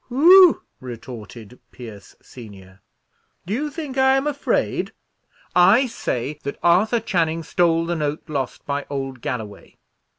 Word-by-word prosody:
"Whew!" 345 +7 +6 0.2
retorted 120 -2 -10
Pierce 110 -5 -12
senior, 100 -5 -14 0.6
"do 190 - -4
you 295 +6 -2
think 290 -4 -5
I 265 0 +4
am 270 - -1
afraid? 290 -1 -1 0.6
I 190 +9 +5
say 150 - -4
that 140 - -6
Arthur 195 +7 +3
Channing 165 -6 -1
stole 165 0 +1
the 170 +1 -2
note 150 -1 -3
lost 140 -4 -4
by 140 0 -3
old 135 -3 -5
Galloway." 110 -5 -7
160 Hz, 130 wpm, -21 LUFS, -, 0.6 s, Whew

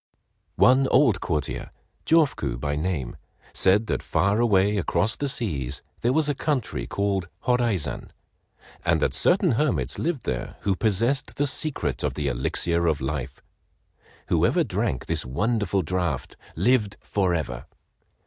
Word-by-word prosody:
One 130 +1 +5
old 120 -10 +4
courtier, 75 -4 -2 0.4
Jofuku 140 - +2
by 70 +2 -2
name, 75 -5 -3 0.4
said 100 +4 +3
that - - -2
far 100 +3 +1
away 105 -3 +3
across 105 +3 +1
the 145 - -2
seas 75 - -3 0.2
there 120 - +1
was 155 +2 +2
a 145 - +1
country 130 - -2
called 100 +1 -1 0.2
Horaizan, 115 - 0 0.7
and - - +2
that - - +1
certain - - +3
hermits 140 +4 0
lived 160 -5 -2
there - - -3
who 100 -1 +1
possessed 115 +7 0
the 145 - +1
secret 130 - -2
of - - -1
the 75 -2 -1
"Elixir 85 +7 0
of 80 -3 +1
Life." 65 -1 -4 0.9
Whoever - - +3
drank 60 - -2
of - - -19
this - - -1
wonderful 100 - 0
draught 85 -4 -2 0.2
lived 105 +2 +2
forever. 85 -11 -1
95 Hz, 140 wpm, -25 LUFS, 75-120 Hz, 0.9 s, One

